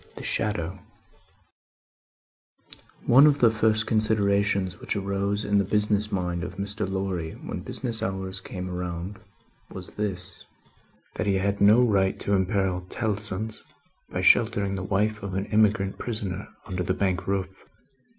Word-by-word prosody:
The -, -, -8 dB
Shadow 95 Hz, -3 st, -1 dB, 2.3 s
One 135 Hz, +5 st, +8 dB
of 145 Hz, -1 st, +4 dB
the 115 Hz, -4 st, +5 dB
first 110 Hz, 0 st, +2 dB
considerations 100 Hz, -4 st, +1 dB
which -, -, -3 dB
arose 100 Hz, +1 st, -1 dB
in 100 Hz, 0 st, +3 dB
the -, -, +3 dB
business 105 Hz, +1 st, +1 dB
mind 90 Hz, -2 st, -1 dB
of 90 Hz, -, -6 dB
Mr. 100 Hz, +1 st, -3 dB
Lorry 95 Hz, -4 st, -2 dB
when -, -, -6 dB
business 115 Hz, -3 st, -2 dB
hours 95 Hz, -1 st, -3 dB
came 90 Hz, -1 st, -6 dB
round, 90 Hz, +2 st, -5 dB, 0.5 s
was -, -, -7 dB
this: 95 Hz, -4 st, -4 dB, 0.7 s
that -, -, -2 dB
he 100 Hz, -, +3 dB
had 100 Hz, +1 st, 0 dB
no 105 Hz, +5 st, +7 dB
right 100 Hz, -5 st, +2 dB
to 100 Hz, -, 0 dB
imperil 95 Hz, -1 st, +1 dB
Tellson's 105 Hz, -1 st, -2 dB, 0.5 s
by -, -, -2 dB
sheltering 105 Hz, -4 st, +4 dB
the 95 Hz, -, -3 dB
wife 105 Hz, +3 st, 0 dB
of 100 Hz, -2 st, -5 dB
an 95 Hz, +1 st, -1 dB
emigrant 105 Hz, -2 st, +2 dB
prisoner 105 Hz, -6 st, -2 dB, 0.2 s
under 90 Hz, -1 st, -3 dB
the 90 Hz, +1 st, 0 dB
Bank 95 Hz, -2 st, -1 dB
roof. 95 Hz, -1 st, -2 dB
100 Hz, 140 wpm, -26 LUFS, 95-105 Hz, 2.3 s, One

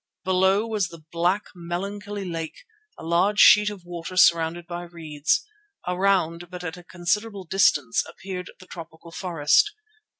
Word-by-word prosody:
Below 190 Hz, +3 st, +2 dB
was 215 Hz, -4 st, -1 dB
the 165 Hz, -2 st, -13 dB
black, 180 Hz, +5 st, +1 dB
melancholy 200 Hz, +3 st, -5 dB
lake, 165 Hz, -, -6 dB, 0.3 s
a -, -, -11 dB
large 180 Hz, +5 st, +2 dB
sheet 210 Hz, 0 st, +8 dB
of 195 Hz, -4 st, -10 dB
water 175 Hz, +1 st, -7 dB
surrounded 170 Hz, -1 st, +4 dB
by 175 Hz, 0 st, -6 dB
reeds. 170 Hz, -, -1 dB, 0.4 s
Around, 180 Hz, -2 st, +1 dB
but 180 Hz, -1 st, -8 dB
at 160 Hz, -2 st, -4 dB
a 180 Hz, -, -13 dB
considerable 195 Hz, +4 st, -2 dB
distance, 150 Hz, -9 st, +2 dB
appeared 185 Hz, -1 st, -7 dB
the 185 Hz, -, -14 dB
tropical 165 Hz, -1 st, -11 dB
forest. 170 Hz, -, +2 dB
180 Hz, 140 wpm, -24 LUFS, 170-195 Hz, 0.4 s, sheet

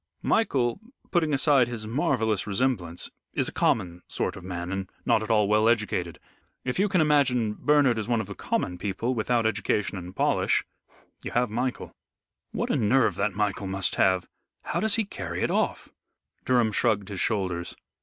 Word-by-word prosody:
Michael, 135 Hz, -, +1 dB, 0.3 s
putting 165 Hz, -4 st, +2 dB
aside 140 Hz, -3 st, +4 dB
his 115 Hz, -3 st, -5 dB
marvellous 110 Hz, -4 st, 0 dB
resemblance, 100 Hz, -6 st, -1 dB, 0.2 s
is -, -, 0 dB
a -, -, -4 dB
common 90 Hz, -5 st, 0 dB
sort -, -, -2 dB
of 95 Hz, -, -10 dB
man 90 Hz, -1 st, -5 dB
and 95 Hz, -1 st, -3 dB, 0.2 s
not -, -, +3 dB
at 110 Hz, -, -5 dB
all 105 Hz, -2 st, +3 dB
well 105 Hz, +2 st, +4 dB
educated. 100 Hz, -7 st, 0 dB, 0.5 s
If 125 Hz, +6 st, -2 dB
you 205 Hz, +1 st, +3 dB
can 185 Hz, -3 st, +3 dB
image 145 Hz, -3 st, +4 dB, 0.3 s
Bernard 145 Hz, -6 st, +3 dB
as 110 Hz, -, -4 dB
one 120 Hz, -2 st, +1 dB
of 110 Hz, -, -2 dB
the 100 Hz, -, -7 dB
common 90 Hz, -2 st, -2 dB
people, 105 Hz, +6 st, -2 dB
without 115 Hz, 0 st, 0 dB
education 105 Hz, -3 st, 0 dB
and 90 Hz, +1 st, -9 dB
polish, -, -, +2 dB, 0.6 s
you -, -, -5 dB
have 120 Hz, -2 st, +1 dB
Michael." 125 Hz, +3 st, -3 dB, 0.6 s
"What -, -, -2 dB
a -, -, +2 dB
nerve 120 Hz, +4 st, +3 dB
that 100 Hz, 0 st, 0 dB
Michael 100 Hz, -1 st, -1 dB
must 95 Hz, -1 st, 0 dB
have. 95 Hz, -1 st, +2 dB, 0.4 s
How -, -, -2 dB
does 220 Hz, -1 st, +2 dB
he 225 Hz, -, +1 dB
carry -, -, -5 dB
it -, -, +1 dB
off?" -, -, -1 dB, 0.6 s
Durham 120 Hz, -3 st, +3 dB
shrugged 105 Hz, -2 st, +1 dB
his 100 Hz, -2 st, -5 dB
shoulders. 95 Hz, -5 st, -1 dB
110 Hz, 175 wpm, -26 LUFS, 95-125 Hz, 0.6 s, aside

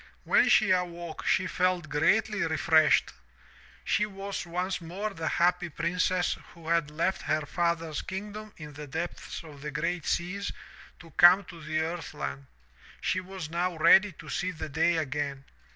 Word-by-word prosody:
''When -, -, +5 dB
she 215 Hz, -3 st, +5 dB
awoke 175 Hz, -2 st, -2 dB
she -, -, +3 dB
felt 180 Hz, -2 st, 0 dB
greatly 210 Hz, +8 st, +2 dB
refreshed. 160 Hz, -2 st, +3 dB, 0.7 s
She 210 Hz, -, +1 dB
was 195 Hz, -2 st, -5 dB
once 180 Hz, +2 st, -2 dB
more 190 Hz, +6 st, -4 dB
the 165 Hz, -4 st, -4 dB
happy 175 Hz, 0 st, +2 dB
princess 180 Hz, +2 st, 0 dB, 0.2 s
who 165 Hz, -1 st, -9 dB
had 165 Hz, -3 st, +2 dB
left 165 Hz, +5 st, -1 dB
her 155 Hz, -1 st, 0 dB
father's 165 Hz, -1 st, -1 dB
kingdom 210 Hz, +3 st, -6 dB
in 150 Hz, -2 st, -9 dB
the 150 Hz, +1 st, -8 dB
depths 165 Hz, +4 st, -5 dB
of 150 Hz, -3 st, -12 dB
the 150 Hz, -, -4 dB
great 165 Hz, +3 st, -2 dB
seas 195 Hz, +4 st, -1 dB, 0.5 s
to 165 Hz, -1 st, -14 dB
come 175 Hz, +5 st, +7 dB
to 175 Hz, -2 st, -12 dB
the 155 Hz, +1 st, -1 dB
earth 165 Hz, +1 st, -4 dB
land. 70 Hz, -1 st, -5 dB, 0.5 s
She 185 Hz, -, 0 dB
was 185 Hz, -4 st, -7 dB
now 175 Hz, 0 st, -1 dB
ready 195 Hz, +5 st, +6 dB
to 155 Hz, -, -13 dB
see 180 Hz, +4 st, -2 dB
the 160 Hz, -3 st, -6 dB
day 165 Hz, +3 st, +2 dB
again. 140 Hz, -2 st, -3 dB
170 Hz, 160 wpm, -28 LUFS, 155-185 Hz, 0.7 s, come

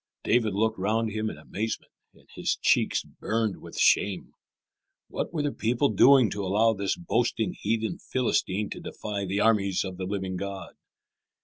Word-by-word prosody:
David 110 Hz, -4 st, +2 dB
looked 110 Hz, 0 st, 0 dB
round 110 Hz, +3 st, 0 dB
him 110 Hz, +1 st, -2 dB
in -, -, -8 dB
amazement, 110 Hz, +2 st, -4 dB, 0.2 s
and -, -, -23 dB
his -, -, -1 dB
cheeks -, -, +2 dB
burned 110 Hz, -1 st, -2 dB
with -, -, -10 dB
shame. 100 Hz, -3 st, +2 dB, 0.8 s
What -, -, -3 dB
were 155 Hz, -4 st, -2 dB
the 145 Hz, -, 0 dB
people 120 Hz, +5 st, +1 dB
doing 130 Hz, -6 st, +6 dB
to 100 Hz, 0 st, -3 dB
allow 105 Hz, +4 st, +3 dB
this 100 Hz, -, -2 dB
boasting 120 Hz, -, 0 dB
heathen 110 Hz, +1 st, -1 dB
Philistine 105 Hz, -5 st, -1 dB
to -, -, -5 dB
defy 100 Hz, -2 st, -5 dB
the 100 Hz, +2 st, -1 dB
armies 100 Hz, -4 st, +2 dB
of 95 Hz, -2 st, -6 dB
the 95 Hz, -, -4 dB
living 95 Hz, -1 st, -3 dB
God? 100 Hz, 0 st, -6 dB
105 Hz, 165 wpm, -27 LUFS, 100-115 Hz, 0.8 s, doing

